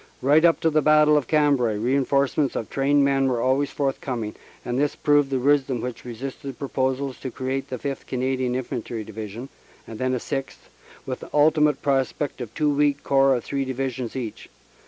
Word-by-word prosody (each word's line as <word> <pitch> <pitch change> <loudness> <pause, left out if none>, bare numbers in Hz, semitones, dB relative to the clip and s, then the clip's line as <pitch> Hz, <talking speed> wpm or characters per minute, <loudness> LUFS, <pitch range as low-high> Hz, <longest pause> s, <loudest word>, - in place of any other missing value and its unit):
Right 145 +4 +5
up 170 -1 +5
to 160 - +2
the 155 0 +3
Battle 150 0 +5
of 145 -5 +1
Cambrai 140 -7 +2
reinforcements 140 +4 +1
of 115 - -4
trained 140 +1 +3
men 135 -1 +2
were 125 -2 0
always 130 +4 +1
forthcoming, 130 -5 -3 0.3
and 125 +1 -1
this 145 0 +1
proved 145 -2 +3
the 135 - 0
wisdom 135 -1 +2
which 125 +1 -6
resisted 130 +2 -7
proposals 130 -1 -2
to 130 - -5
create 130 +2 -3
the 130 - -4
Sth. 140 +2 -5
Canadian 130 -1 -1
Infantry 120 -3 -4
Divi 110 0 -7
sion, 115 +7 -8 0.4
and 110 - -9
then 130 0 0
a - - -2
sixth, 135 +2 -5 0.4
with - - -4
the - - -10
ultimate 150 -1 +3
prospect 135 0 -1
of 115 -3 -6
two 150 -1 +2
weak 145 0 +1
Corps 135 -1 +4
of 120 - -3
three 140 -1 -2
Divisions 130 -2 -4
each. 120 -5 -6
135 Hz, 185 wpm, -24 LUFS, 125-145 Hz, 0.4 s, Right